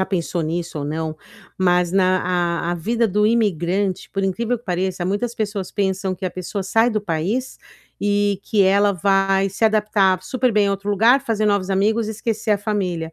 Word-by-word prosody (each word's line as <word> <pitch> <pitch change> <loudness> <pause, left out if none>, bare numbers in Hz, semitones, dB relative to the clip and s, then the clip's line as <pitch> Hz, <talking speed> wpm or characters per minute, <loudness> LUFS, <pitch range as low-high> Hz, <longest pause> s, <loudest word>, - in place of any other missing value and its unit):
já - - +2
pensou 175 -2 -2
nisso 165 0 -3
ou - - -3
não, 155 +1 -3 0.4
mas 180 -1 +2
na 185 -1 +3 0.5
a - - +1
a - - -1
vida 230 +7 0
do 210 +1 +1
imigrante, 195 -4 0
por 195 0 -2
incrível 230 +5 -1
que 240 - -25
pareça, 180 -1 -2
muitas 205 +6 -2
pessoas 205 -4 -3
pensam 190 -1 -1
que 185 - -7
a 185 - -1
pessoa 185 +2 -5
sai 225 +5 +2
do 215 - -1
país 200 +8 -2 0.4
e 205 -1 +1
que 205 -1 +2
ela 200 +2 +4
vai 195 +1 +2
se 195 +4 -2
adaptar 210 -4 +2
super 255 -1 0
bem 210 -1 +3
a - - +1
outro 200 +1 -3
lugar, 230 +7 +4
fazer 215 -3 0
novos 200 -2 +1
amigos 215 +3 +1
e - - -2
esquecer 220 0 -3
a 205 - +1
família. 185 -6 -2
195 Hz, 195 wpm, -21 LUFS, 185-215 Hz, 0.5 s, ela